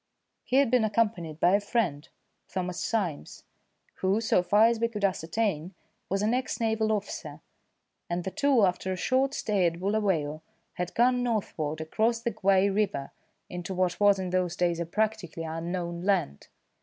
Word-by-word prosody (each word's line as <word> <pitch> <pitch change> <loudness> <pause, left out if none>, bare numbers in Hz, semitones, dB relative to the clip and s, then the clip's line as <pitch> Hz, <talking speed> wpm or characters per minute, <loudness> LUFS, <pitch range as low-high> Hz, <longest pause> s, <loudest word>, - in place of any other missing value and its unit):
He 255 - -2
had 275 -3 +4
been 250 -3 +4
accompanied 205 -8 0
by 175 +2 +4
a 200 - +5
friend, 195 - -1 0.4
Thomas 180 -1 -3
Symes, 180 - -3 0.5
who, 190 +3 +1
so 225 -5 +2
far 205 +5 +4
as 230 0 +2
we 230 - +2
could 210 -3 -2
ascertain, 185 -1 -1 0.3
was 195 +2 0
an 220 +3 +2
ex 255 0 -2
naval 220 -1 +1
officer; 180 -8 -4 0.7
and 175 0 -2
the 190 - -4
two, 280 -6 +3
after 185 +1 -1
a - - -1
short 265 +8 +1
stay 200 -4 +1
at 170 0 -3
Bulawayo, 185 -7 0 0.3
had 180 0 -4
gone 250 +1 +3
northward 165 -10 -2
across 225 +9 0
the 235 0 -2
Guai 195 -1 +3
river 195 -9 -1 0.4
into 180 +1 -5
what 180 -1 0
was 205 -1 +5
in 185 -1 -3
those 180 -2 0
days 175 -1 0
a 170 - -3
practically 210 -4 -2
unknown 170 +2 -4
land. 185 - 0
195 Hz, 170 wpm, -28 LUFS, 175-220 Hz, 0.7 s, a